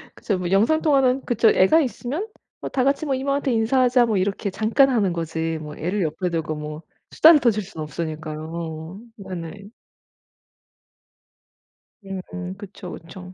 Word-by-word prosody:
그쵸. 200 -4 -2
뭐 180 0 -3
영상통화는 270 +3 +3
그쵸 230 -2 +3
애가 190 +13 +5
있으면 280 - -3 0.3
뭐 - - -4
다 260 - 0
같이 275 +3 +1
뭐 270 -2 0
"이모한테 275 0 -1
인사하자." 245 +2 +3
뭐 215 -4 0
이렇게 200 +2 -1
잠깐 225 +8 +3
하는 205 -8 +1
거지. 165 -1 -2
뭐 150 -1 -8
애를 185 +6 -2
옆에 165 +4 -2
두고 160 -2 -2
뭐 150 +1 -6 0.3
수다를 320 -1 +7
떠실 215 -6 +1
수는 170 -5 -7
없으니까요. 160 +2 -6 0.2
네네. 185 0 -7 2.7
음 185 +1 -5
그쵸 200 -2 -9
그쵸. 180 +2 -10
195 Hz, 295 characters per minute, -23 LUFS, 165-250 Hz, 2.7 s, 수다를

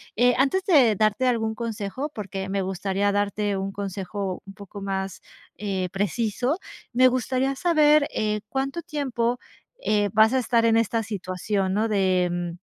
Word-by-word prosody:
Eh, 245 +2 +4
antes 325 +9 +2
de 260 - +5
darte 215 +5 +2
algún 225 -2 +1
consejo 230 +5 -4
porque 195 -2 -5
me 195 -1 -1
gustaría 195 +2 -1
darte 205 0 0
un 195 +1 -3
consejo 195 -1 -4
un 195 0 -11
poco 200 -1 -10
más, 195 -1 -3 0.3
eh, 190 -2 -2
preciso. 225 - -1 0.3
Me 255 +2 +5
gustaría 255 +2 0
saber, 305 -2 +4
eh, 210 -1 -1
¿cuánto 275 +5 -2
tiempo, 250 -6 -1 0.4
eh, 205 -1 +1
vas 220 +3 +5
a 260 - +3
estar 235 -1 +2
en 225 0 +4
esta 230 0 +1
situación?, 190 -1 -2
¿no?, 220 +2 +1
de, 185 -4 +2
mm, 175 0 -3
210 Hz, 155 wpm, -25 LUFS, 195-250 Hz, 0.4 s, de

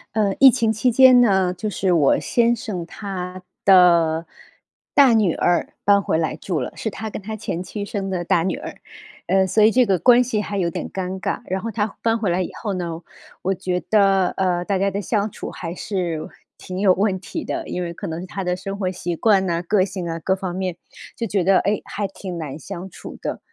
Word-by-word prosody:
呃， 205 -3 +1
疫 270 -1 +10
情 230 -3 +1
期 245 +4 +1
间 255 0 +7
呢， 190 -5 +3
就 200 +4 -4
是 190 -3 0
我 150 -5 +4
先 235 0 +2
生 205 -7 -5
他 185 -1 -6 0.2
的 170 -4 +5 0.7
大 275 -4 +6
女 210 -7 +3
儿 175 0 +1
搬 200 0 +4
回 160 - 0
来 160 -2 -1
住 165 +1 -3
了， - - -4
是 220 - -3
他 220 +1 -6
跟 210 - -7
他 215 +2 -6
前 180 -4 -4
妻 200 +3 -5
生 200 -2 -4
的 180 -2 -3
大 165 0 +2
女 185 0 -1
儿。 - - -8 0.5
呃， 190 +2 +3
所 215 +4 +3
以 215 - +6
这 250 +2 +4
个 195 -4 +2
关 245 +4 +6
系 230 -4 -1
还 205 -1 -4
有 175 -3 +1
点 - - -5
尴 190 0 -4
尬， - - -2
然 190 +1 -2
后 230 - -4
她 210 -1 -2
搬 225 0 +1
回 210 -4 0
来 175 +2 +1
以 180 - -4
后 205 -3 -2
呢， 170 -3 -4 0.4
我 190 - +1
觉 180 0 -2
得， 195 -3 +4
呃， 180 -2 -1
大 200 0 0
家 195 +1 +1
的 200 +1 -3
相 205 +2 -1
处 - - -7
还 170 -1 -6
是 175 -4 -3 0.3
挺 185 0 -7
有 195 - +5
问 195 +1 0
题 300 - -6
的， 335 -1 -3
因 180 - -3
为 170 -1 -4
可 - - -7
能 160 0 -4
是 185 - -7
她 195 +1 -5
的 180 0 -1
生 195 +1 -6
活 185 -2 -1
习 175 -1 -4
惯 195 +1 +3
哪、 170 -1 -1
个 185 +1 +2
性 185 -3 -5
啊， 165 0 -4
各 190 +4 0
方 185 -2 -5
面， 185 -1 -3 0.4
就 230 - -3
觉 195 -4 0
得， 195 -1 +5
哎， 205 +2 0
还 205 - -3
挺 185 -2 -7
难 155 -2 -6
相 175 +4 -7
处 - - -10
的。 - - -4
190 Hz, 245 characters per minute, -21 LUFS, 180-210 Hz, 0.7 s, 疫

